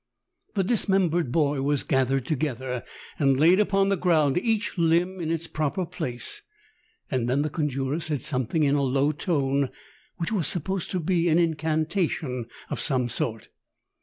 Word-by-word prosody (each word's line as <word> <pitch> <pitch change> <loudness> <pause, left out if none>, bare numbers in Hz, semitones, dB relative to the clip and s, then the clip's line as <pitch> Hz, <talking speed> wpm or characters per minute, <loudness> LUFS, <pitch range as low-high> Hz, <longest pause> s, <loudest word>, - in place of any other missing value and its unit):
The 195 - +2
dismembered 185 - +1
boy 145 -2 +1
was 145 0 +1
gathered 135 -1 +1
to 155 - 0
gether 130 -3 -3 0.4
and 135 -3 +3
laid 170 +6 +6
upon 195 -1 +3
the 200 - +3
ground, 160 -6 +2
each 225 +1 0
limb 175 +2 +2
in 165 -2 -3
its 165 0 -1
proper 155 +4 -2
place, 130 - -5 0.7
and 125 -3 0
then 140 +3 +2
the 155 - -2
conjurer 145 -2 -1
said 150 -5 -2
something 130 +5 0
in 140 -1 +3
a 145 - +2
low 135 +2 +2
tone 140 -4 0
I - - -7 0.5
which 170 - -2
was 195 -8 +1
supposed 185 +2 -2
to 185 - -1
be 170 0 +1
an 160 - +4
incanta 160 +1 +1
tion 125 -6 -4 0.2
of - - -2
some 130 -5 0
sort. 115 -2 -3
155 Hz, 170 wpm, -26 LUFS, 135-175 Hz, 0.7 s, laid